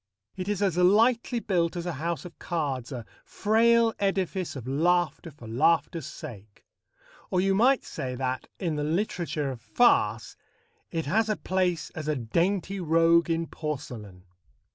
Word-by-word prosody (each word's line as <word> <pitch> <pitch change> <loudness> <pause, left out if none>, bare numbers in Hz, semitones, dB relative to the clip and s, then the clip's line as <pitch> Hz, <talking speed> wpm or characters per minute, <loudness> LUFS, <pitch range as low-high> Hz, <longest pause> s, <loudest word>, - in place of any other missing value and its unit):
It 185 0 -5
is 205 -1 0
as 185 -4 +1
lightly 230 +6 +3
built 175 -6 0
as 175 -1 -4
a 175 - -1
house 170 +1 -2
of 175 - -11
cards, 140 -7 -3
a 120 -4 -6 0.2
frail 230 +1 +3
edifice 190 -3 -1
of 125 -3 -7
laughter 170 +4 +1
for 130 -7 -13
laughter's 155 +5 +1
sake. 110 -10 -10 0.6
Or 180 - +1
you 195 +1 +2
might 245 +7 +4
say 125 -1 -5
that, 130 0 -3
in 165 -5 -2
the 150 - -1
literature 160 -3 -1
of 120 -3 -8
farce, 245 - +2 0.5
it 165 -2 -3
has 215 +9 +1
a 215 - 0
place 180 -3 -1
as 155 -1 -6
a 155 - +1
"dainty 175 - -1
rogue 165 0 +3
in 165 0 0
porcelain." 120 - -6
170 Hz, 155 wpm, -27 LUFS, 145-195 Hz, 0.6 s, might